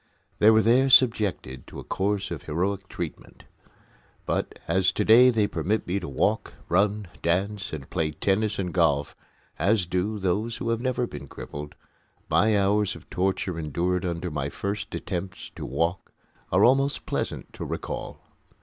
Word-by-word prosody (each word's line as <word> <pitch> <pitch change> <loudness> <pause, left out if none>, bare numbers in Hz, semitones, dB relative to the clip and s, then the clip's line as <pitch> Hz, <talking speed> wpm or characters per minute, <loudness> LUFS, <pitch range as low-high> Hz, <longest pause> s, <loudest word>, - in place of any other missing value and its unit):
They 105 - +7
were 110 0 +5
there 125 +5 +4
subjected 105 - +3
to - - -9
a - - -7
course 100 0 -1
of 80 -5 -4
heroic 95 +5 -2
treatment; 85 -3 -7 0.8
but - - -2
as 95 +2 +3
to 105 - 0
day 120 +4 +8
they 110 -4 +2
permit 105 +1 -1
me 95 +3 -1
to 90 - -6
walk, 65 - 0
run, 100 +3 +2
dance, 95 +3 -1
and 70 -4 -6
play 80 -4 -1
tennis 100 +7 0
and 90 -3 -3
golf, 75 -5 +2 0.4
as 100 -2 +2
do 90 +5 -1
those 105 +4 -1
who 115 - -3
have 115 0 0
never 125 -1 0
been 70 -9 -8
crippled, 75 +2 -8 0.6
my 105 -1 +4
hours 100 +1 +2
of - - -14
torture 95 -1 -1
endured 85 +4 -1
under 85 -1 -3
my 70 -2 -2
first 100 +5 -4
attempts 90 +1 -5
to - - -6
walk 85 +8 -1 0.4
are 95 +4 +5
almost 135 +3 +2
pleasant - - -3
to - - -6
recall. - - -5
95 Hz, 160 wpm, -26 LUFS, 85-105 Hz, 0.8 s, day